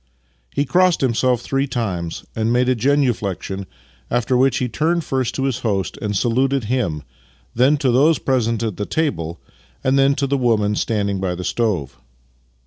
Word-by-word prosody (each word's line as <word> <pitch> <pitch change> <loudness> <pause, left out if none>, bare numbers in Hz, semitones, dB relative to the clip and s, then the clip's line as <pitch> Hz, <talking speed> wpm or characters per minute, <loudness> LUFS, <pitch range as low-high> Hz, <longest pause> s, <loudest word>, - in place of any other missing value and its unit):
He 145 - 0
crossed 180 +2 +3
himself 125 -1 +1
three 135 +2 -1
times 95 -10 -3
and 110 +1 0
made 125 +1 +2
a 130 - +4
genuflexion, 110 -7 0 0.4
after 120 +2 +1
which 130 0 +3
he 125 - 0
turned 165 +8 0
first 130 -4 -1
to 135 - -1
his 135 -3 -1
host 100 -5 -1
and 105 -1 -1
saluted 130 +4 +1
him, 105 - -1 0.5
then 130 +5 +3
to 135 -3 +1
those 145 +6 +4
present 115 -4 0
at 110 -4 -3
the 105 - -3
table, 85 - -2 0.4
and 135 +1 +3
then 135 +1 +4
to 140 - 0
the 140 0 0
women 110 -4 +2
standing 100 -2 -1
by 95 -2 -1
the 90 - -6
stove. 90 - -1
120 Hz, 170 wpm, -20 LUFS, 105-135 Hz, 0.5 s, a